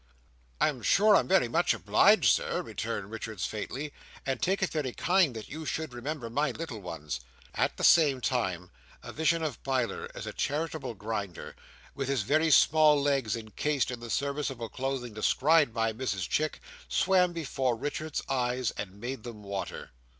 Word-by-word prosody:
"I -, -, +4 dB
am 135 Hz, -5 st, -6 dB
sure 210 Hz, -, +5 dB
I -, -, +7 dB
am -, -, -2 dB
very 190 Hz, -9 st, +4 dB
much 115 Hz, -, +2 dB
obliged, -, -, +4 dB
Sir," -, -, -1 dB
returned 100 Hz, +1 st, -4 dB
Richards 110 Hz, -3 st, -4 dB
faintly, 135 Hz, +7 st, -5 dB, 0.3 s
"and 135 Hz, -1 st, -2 dB
take 195 Hz, +2 st, +1 dB
it 190 Hz, -, 0 dB
very 145 Hz, -6 st, -2 dB
kind 175 Hz, -8 st, +2 dB
that 110 Hz, -, -7 dB
you 155 Hz, +2 st, -7 dB
should 155 Hz, -3 st, -3 dB
remember 125 Hz, +1 st, -4 dB
my 145 Hz, +6 st, 0 dB
little 160 Hz, -10 st, -6 dB
ones." 75 Hz, -7 st, -5 dB, 0.3 s
At -, -, 0 dB
the -, -, -5 dB
same 145 Hz, -6 st, +6 dB
time 95 Hz, -9 st, -1 dB, 0.3 s
a -, -, -8 dB
vision 160 Hz, +2 st, +1 dB
of 150 Hz, -5 st, -3 dB
Biler 130 Hz, -6 st, -1 dB
as -, -, -6 dB
a -, -, -5 dB
Charitable 155 Hz, -4 st, -2 dB
Grinder, 100 Hz, -4 st, -5 dB, 0.4 s
with 135 Hz, -1 st, -3 dB
his 135 Hz, -5 st, 0 dB
very 155 Hz, +8 st, +2 dB
small 155 Hz, -1 st, +6 dB
legs 135 Hz, -6 st, +1 dB
encased 125 Hz, +5 st, -1 dB
in 125 Hz, -, -5 dB
the 120 Hz, 0 st, -8 dB
serviceable 140 Hz, -4 st, -2 dB
clothing 130 Hz, -3 st, -3 dB
described 145 Hz, +6 st, +3 dB
by 115 Hz, -1 st, 0 dB
Mrs 105 Hz, -7 st, -2 dB
Chick, 155 Hz, 0 st, -1 dB, 0.3 s
swam 180 Hz, -1 st, +3 dB
before 135 Hz, -7 st, -1 dB
Richards's 145 Hz, +5 st, -4 dB
eyes, 125 Hz, -2 st, 0 dB
and 100 Hz, +1 st, -7 dB
made 125 Hz, +2 st, -5 dB
them 110 Hz, -3 st, -9 dB
water. 100 Hz, -1 st, -5 dB
130 Hz, 170 wpm, -29 LUFS, 115-155 Hz, 0.4 s, I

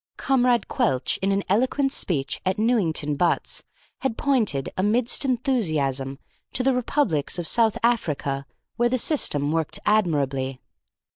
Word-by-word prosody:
Comrade 250 Hz, -4 st, +1 dB
Quelch, 130 Hz, -1 st, 0 dB
in 195 Hz, +1 st, +1 dB
an 195 Hz, 0 st, 0 dB
eloquent 260 Hz, +7 st, +1 dB
speech 145 Hz, -, -1 dB
at 185 Hz, 0 st, -1 dB
Newington 190 Hz, -10 st, +1 dB
Butts, 170 Hz, +4 st, 0 dB, 0.4 s
had 265 Hz, -4 st, -2 dB
pointed, 220 Hz, -, 0 dB
amidst 225 Hz, +8 st, +2 dB
enthusiasm, 155 Hz, -, 0 dB, 0.4 s
to 250 Hz, -, +2 dB
the 270 Hz, +1 st, +2 dB
republics 240 Hz, -, 0 dB
of 175 Hz, -2 st, -4 dB
South 225 Hz, -2 st, +3 dB
America, 145 Hz, -, -1 dB, 0.3 s
where 240 Hz, 0 st, +2 dB
the 255 Hz, -, +1 dB
system 150 Hz, -, +2 dB
worked 160 Hz, -1 st, -1 dB
admirably. 140 Hz, -10 st, 0 dB
195 Hz, 130 wpm, -24 LUFS, 145-245 Hz, 0.4 s, South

